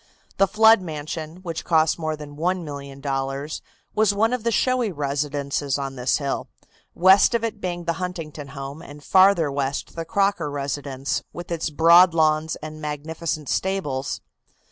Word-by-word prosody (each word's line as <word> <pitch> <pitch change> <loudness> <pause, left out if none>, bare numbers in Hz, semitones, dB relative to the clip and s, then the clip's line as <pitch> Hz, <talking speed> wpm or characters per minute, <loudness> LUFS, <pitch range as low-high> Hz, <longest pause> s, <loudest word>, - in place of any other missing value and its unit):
The 195 - +4
Flood 220 +1 +6
mansion, 155 +1 -6
which 165 -3 -4
cost 160 -1 +2
more 155 -1 -2
than 150 -1 -10
$1,000,000, 140 -4 -3 0.3
was 215 -2 +3
one 225 +4 +2
of 250 -3 -2
the 235 - +1
showy 250 -1 +1
residences 140 -1 -2
on 135 -1 -4
this 125 0 +1
hill, 140 -2 -3 0.5
west 190 +6 +6
of 230 - 0
it 225 -2 -3
being 175 -1 -3
the 170 0 0
Huntington 160 -5 -5
home 140 +3 -6
and 145 -2 -12
farther 185 -5 +5
west 140 0 -3
the 165 - -3
Crocker 195 -3 0
residence, 140 -1 -3
with 175 0 -8
its 165 -1 -1
broad 170 +3 +6
lawns 155 0 +2
and 155 0 -7
magnificent 155 +1 -4
stables. 150 -9 -2
155 Hz, 150 wpm, -23 LUFS, 145-185 Hz, 0.5 s, Flood